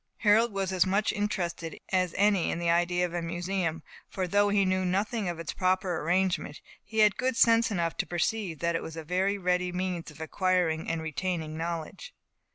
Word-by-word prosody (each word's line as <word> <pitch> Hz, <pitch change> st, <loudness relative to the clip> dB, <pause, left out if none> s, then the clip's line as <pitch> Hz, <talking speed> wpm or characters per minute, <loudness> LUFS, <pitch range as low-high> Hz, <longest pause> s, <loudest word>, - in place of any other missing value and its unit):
Harold 220 Hz, +2 st, +4 dB
was 195 Hz, -1 st, -2 dB
as 185 Hz, -1 st, +4 dB
much 200 Hz, +3 st, +1 dB
interested 175 Hz, -6 st, -3 dB
as 185 Hz, -2 st, +1 dB
any 200 Hz, -3 st, +3 dB
in -, -, -1 dB
the 170 Hz, 0 st, +1 dB
idea 175 Hz, +1 st, +2 dB
of 175 Hz, -, -6 dB
a 175 Hz, -, -1 dB
museum; 170 Hz, -1 st, -2 dB, 0.3 s
for 185 Hz, -1 st, -2 dB
though 205 Hz, +3 st, +3 dB
he 200 Hz, -1 st, +3 dB
knew 185 Hz, 0 st, +1 dB
nothing 200 Hz, +2 st, -1 dB
of 170 Hz, -, -4 dB
its 165 Hz, -2 st, -5 dB
proper 185 Hz, -2 st, 0 dB
arrangement, 175 Hz, -2 st, 0 dB, 0.2 s
he 220 Hz, -, -9 dB
had 210 Hz, -2 st, +5 dB
good 255 Hz, -1 st, 0 dB
sense 230 Hz, 0 st, +5 dB
enough 170 Hz, -5 st, -1 dB
to -, -, -2 dB
perceive 175 Hz, 0 st, -1 dB
that 170 Hz, +1 st, 0 dB
it -, -, -1 dB
was 160 Hz, 0 st, -8 dB
a 160 Hz, -, -5 dB
very 185 Hz, +5 st, 0 dB
ready 180 Hz, -1 st, 0 dB
means 180 Hz, -2 st, -3 dB
of 150 Hz, 0 st, -14 dB
acquiring 165 Hz, -1 st, 0 dB
and 165 Hz, -1 st, -2 dB
retaining 160 Hz, 0 st, -3 dB
knowledge. 165 Hz, -1 st, -5 dB
180 Hz, 195 wpm, -28 LUFS, 170-195 Hz, 0.3 s, had